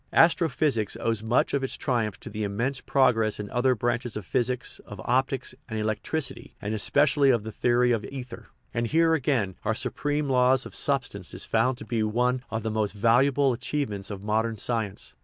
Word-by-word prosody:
Astro 165 0 +5
physics 120 -8 0
owes 115 -2 0
much 110 +2 +1
of 140 -1 +1
its 135 - -1
triumph 110 -6 -1
to - - -8
the 105 0 -3
immense 120 +7 -2
prog 130 -4 +3
ress 110 -1 0
of 105 - -4
other 130 +1 +2
branches 120 0 -2
of 105 - -6
physics, 125 +6 -1
of 105 - -10
optics, 130 +1 0 0.2
and 110 - -3
elec 110 0 -1
tricity, 160 -4 -4
and 105 +1 -3
especially 140 +6 +3
of 120 -5 +3
the 110 - -6
theory 120 +2 +2
of 115 -3 0
ether. 125 -3 -8 0.3
And 120 -1 0
here, 165 +4 +3
again, 125 - 0
our 110 - 0
supreme 145 +4 -2
law 130 -1 +4
of 130 - -5
substance 125 -11 -1
is 90 - -2
found 120 +3 +1
to - - -8
be 115 -3 -1
one 125 +4 +1
of 110 0 -3
the 110 - -1
most 105 -2 -1
valuable 125 +5 +3
achievements 120 -6 -3
of 100 -2 -7
modern 110 +1 0
science. 110 -3 -3
120 Hz, 195 wpm, -26 LUFS, 110-130 Hz, 0.3 s, Astro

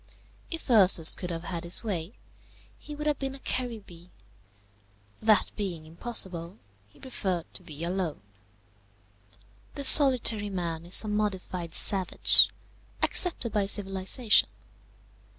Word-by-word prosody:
If 330 -2 -8
Ursus 185 -7 +5
could 180 - -6
have 165 -1 -7
had 170 -2 -7
his 170 +5 +2
way, 190 -2 -6 0.6
he 300 - -11
would 300 +1 -8
have 300 -2 -2
been 270 -1 -6
a - - -13
Caribbee; 215 -11 -8 1.1
that 215 -2 +1
being 180 -7 -7
impossible, 175 0 -3 0.3
he - - -25
preferred 185 -9 -5
to - - -10
be 160 -3 -10
alone. 175 - -5 1.5
The 280 - -7
solitary 250 -7 +6
man 170 -3 -6
is 180 - +1
a - - -8
modified 190 -5 -5
savage, 190 -2 +4 0.5
accepted 295 - +1
by 205 -2 -1
civilization. 195 +3 +1
195 Hz, 120 wpm, -25 LUFS, 175-230 Hz, 1.5 s, solitary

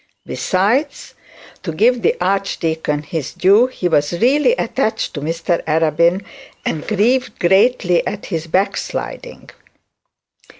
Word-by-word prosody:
Besides, 235 +11 -1 0.5
to 165 - -4
give 235 +9 +2
the 470 - +2
archdeacon 160 - -1
his 155 -3 -5
due, 205 +7 +4
he 255 -8 -3
was 150 -2 +1
really 290 - +3
attached 270 - -2
to 145 - -5
Mr 165 +3 -1
Arabin, 165 +4 +2 0.4
and 155 - -3
grieved 240 +5 +1
greatly 190 -1 +2
at 205 - -5
his 165 -3 -4
backsliding. 185 +4 -3
185 Hz, 115 wpm, -18 LUFS, 165-235 Hz, 0.5 s, due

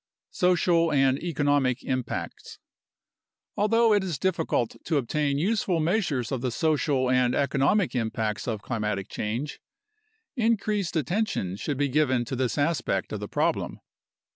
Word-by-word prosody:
Social 175 -2 +2
and 135 -1 +3
Economic 145 -6 +1
Impacts 130 -2 -4 1.0
Although 225 +2 +3
it 205 -2 +3
is 175 -6 -3
difficult 160 -8 0
to 155 - +1
obtain 140 +2 0
useful 185 0 +1
measures 160 - 0
of 130 -3 -2
the 130 - 0
social 145 -1 +1
and 125 -1 +3
eco 140 0 0
nomic 180 +7 +2
impacts 110 -3 -2
of 110 -4 -3
climatic 105 -5 -2
change, 120 +8 -4 0.7
increased 215 -6 0
attention 160 - -1
should 135 +7 -3
be 145 0 +1
given 130 -3 +1
to 130 - -4
this 130 +1 -1
aspect 145 -1 0
of - - -3
the - - -5
problem. - - -1
145 Hz, 140 wpm, -26 LUFS, 125-175 Hz, 1.0 s, and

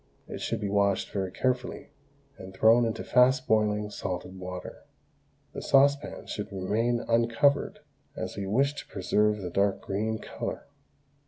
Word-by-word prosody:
It - - -7
should - - -2
be 105 - -2
washed 100 -1 +1
very 95 -2 -2
carefully, 125 +4 -2 0.4
and 95 -7 -11
thrown 115 +4 +5
into 115 - -3
fast 130 +1 +3
boiling 105 -1 +1
salted 95 -1 -5
water. 90 0 -7 0.7
The - - -5
saucepan 140 +1 +2
should 105 +1 -5
remain 115 +6 -1
uncovered, 115 +5 +2 0.3
as - - -5
we 100 -1 -4
wish 135 +8 +2
to - - -9
preserve 105 +3 +1
the 90 - -4
dark 100 +1 +1
green 110 +3 -2
colour. - - -6
105 Hz, 145 wpm, -28 LUFS, 100-120 Hz, 0.7 s, thrown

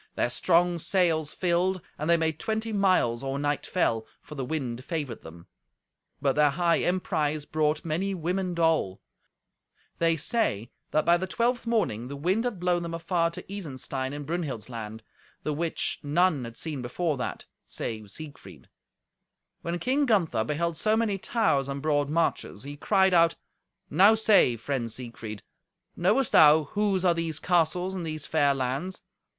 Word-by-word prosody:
Their 120 - 0
strong 175 +6 +2
sails 165 -4 +1
filled, 185 +1 +1 0.2
and 150 +3 -4
they 170 - +6
made 160 -1 -1
twenty 220 0 -2
miles 185 - +2
or 135 0 -2
night 145 0 -1
fell, 115 -11 0
for - - -12
the 135 -3 -4
wind 130 -3 -3
favoured 145 -7 -4
them. 85 +1 -12 0.7
But 135 -1 +2
their 150 -1 +5
high 170 +3 +2
emprise 155 -5 0
brought 155 0 0
many 185 +5 -1
women 180 +1 -2
dole. 160 - +1 1.0
They 165 -1 +3
say 150 - -1 0.2
that 155 - +1
by 170 +1 +5
the 185 +2 -3
twelfth 235 +4 0
morning 160 - 0
the 140 - -6
wind 185 - 0
had 225 -7 -2
blown 175 0 +1
them 170 -1 -4
afar 165 0 0
to 170 - -9
Isenstein 135 -8 -5
in 145 0 -5
Brunhild's 145 - -4
land, 110 -2 -7 0.4
the 150 - -1
which 165 +2 -2
none 150 -2 +2
had 115 0 -9
seen 150 -5 -5
before 150 +6 -1
that, 125 - -4 0.2
save 110 -3 -5
Siegfried. 150 +6 -10 0.9
When 170 +1 -2
King 270 +8 +1
Gunther 165 - +2
beheld 160 +5 -1
so 215 0 +2
many 215 -4 0
towers 145 - +1
and 140 0 -3
broad 145 -1 +1
marches, 165 -3 -1
he 145 +1 -7
cried 190 +4 +3
out, 170 -1 +5 0.6
"Now 195 +8 +6
say, 210 - +4
friend 120 -1 -3
Siegfried; 115 -3 -8 0.5
knowest 215 +9 +2
thou 155 +1 +7
whose 195 +4 0
are 175 - +5
these 165 -2 -2
castles 180 +2 +1
and 185 -2 -4
these 155 -2 -5
fair 145 -3 +2
lands? 135 +8 -3
160 Hz, 160 wpm, -27 LUFS, 140-185 Hz, 1.0 s, thou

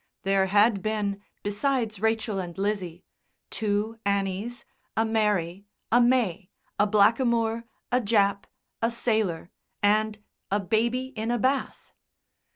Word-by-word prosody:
There 195 0 +2
had 205 +1 +4
been, 205 -1 -2 0.2
besides 220 0 -1
Rachel 220 -1 0
and 175 -2 -6
Lizzie, 190 -4 -3 0.5
two 215 +1 -1
Annies, 200 +4 -2 0.3
a 225 - +3
Mary, 205 -4 0 0.2
a 240 +2 +6
May, 230 -7 +2 0.3
a 210 - +4
Blackamoor, 230 +2 +2 0.3
a 250 +1 +3
Jap, 200 -2 +2 0.4
a 230 - +2
Sailor, 215 -8 -1 0.3
and 215 +1 +2 0.3
a 205 - +1
Baby 235 +6 0
in 220 +1 -3
a 240 - +1
Bath. 260 +4 -1
215 Hz, 120 wpm, -26 LUFS, 200-230 Hz, 0.5 s, a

